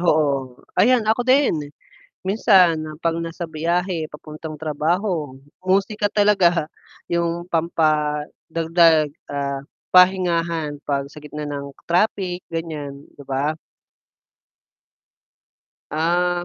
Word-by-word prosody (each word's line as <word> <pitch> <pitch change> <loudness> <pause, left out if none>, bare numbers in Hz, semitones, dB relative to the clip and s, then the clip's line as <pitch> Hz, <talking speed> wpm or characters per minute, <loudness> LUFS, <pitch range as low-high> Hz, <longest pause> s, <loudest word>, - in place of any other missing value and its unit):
Oo. 140 -6 +1 0.2
Ayan 245 -1 +4
ako 220 +3 +2
din! 255 - +2 0.6
Minsan 185 -6 +4 0.2
'pag 165 0 0
nasa 165 +1 -5
biyahe 170 +1 -1
papuntang 155 +1 -8
trabaho, 155 -1 -1 0.3
musika 200 +2 +1
talaga 195 -6 +3 0.4
yung 170 0 -1
pampadagdag, 160 0 +2 0.2
ah, 140 -1 -2 0.3
pahingahan 170 -4 +3
'pag 140 -1 -1
sa 150 - -16
gitna 150 0 -6
ng 140 -1 -5 0.2
traffic 180 0 +1
ganyan, 150 -4 -5
'di 140 - -10
ba? 145 +4 0 2.3
Ah, 175 +3 +1
165 Hz, 90 wpm, -22 LUFS, 150-180 Hz, 2.3 s, Ayan